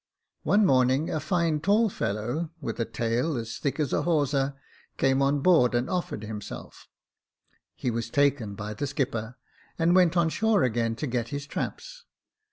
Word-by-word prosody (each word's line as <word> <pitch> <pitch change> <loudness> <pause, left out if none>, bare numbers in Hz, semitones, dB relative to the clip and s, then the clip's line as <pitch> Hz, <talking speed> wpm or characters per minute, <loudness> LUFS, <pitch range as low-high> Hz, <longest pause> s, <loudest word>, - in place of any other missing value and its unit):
" - - -61
One 205 +1 +3
morning, 130 +1 +3
a 155 - -1
fine 165 -1 0
tall 210 +7 +3
fellow, 120 - -2
with - - -5
a 115 - +1
tail 120 +7 -1
as 115 0 -5
thick 140 +1 -2
as 145 -4 0
a - - +2
hawser, 140 -4 +1 0.4
came 135 0 +2
on 140 +1 +2
board 150 -8 +4
and 120 +2 +1
offered 175 - -3
himself; 105 -1 -8 0.9
he 125 - -2
was 115 0 -3
taken 140 -7 +1
by 105 +1 -5
the 140 +7 -3
skipper, 125 -3 -3 0.4
and 165 +1 +3
went 180 -1 +4
on 170 -1 +3
shore 210 +5 +2
again 115 -2 0
to 150 - -4
get 120 -3 -2
his 140 +3 -5
traps. - - -6
140 Hz, 175 wpm, -27 LUFS, 115-165 Hz, 0.9 s, board